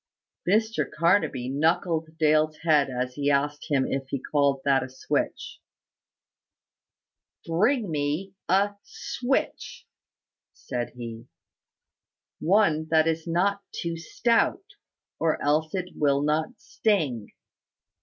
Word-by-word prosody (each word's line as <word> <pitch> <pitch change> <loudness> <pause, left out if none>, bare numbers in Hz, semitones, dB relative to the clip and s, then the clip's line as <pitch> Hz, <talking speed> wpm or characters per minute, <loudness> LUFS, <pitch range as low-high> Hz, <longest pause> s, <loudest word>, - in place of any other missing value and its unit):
Mr 220 +3 +1
Carnaby 165 -6 +1
knuckled 160 +3 0
Dale's 155 -1 +3
head 150 -4 +4
as 125 0 -3
he 145 +1 -1
asked 145 +1 0
him 135 -3 +2
if 135 0 -3
he 140 - -2
called 140 0 +1
that 135 -1 +4
a - - -5
switch. 485 - -3 1.9
"Bring 210 +5 +1
me 150 +6 -2 0.2
a 200 +2 +2
switch" 255 +5 -3 0.7
said 120 -2 -5
he. 115 -1 -8 1.1
"One 165 -4 +2
that 160 0 +4
is 165 +1 -1
not 195 +4 +1
too 170 -1 -4
stout, 230 - +1 0.6
or 160 -1 +1
else 155 +4 +1
it 180 -1 -3
will 140 -1 +2
not 155 +1 -1
sting. 155 - 0
155 Hz, 110 wpm, -26 LUFS, 140-180 Hz, 1.9 s, head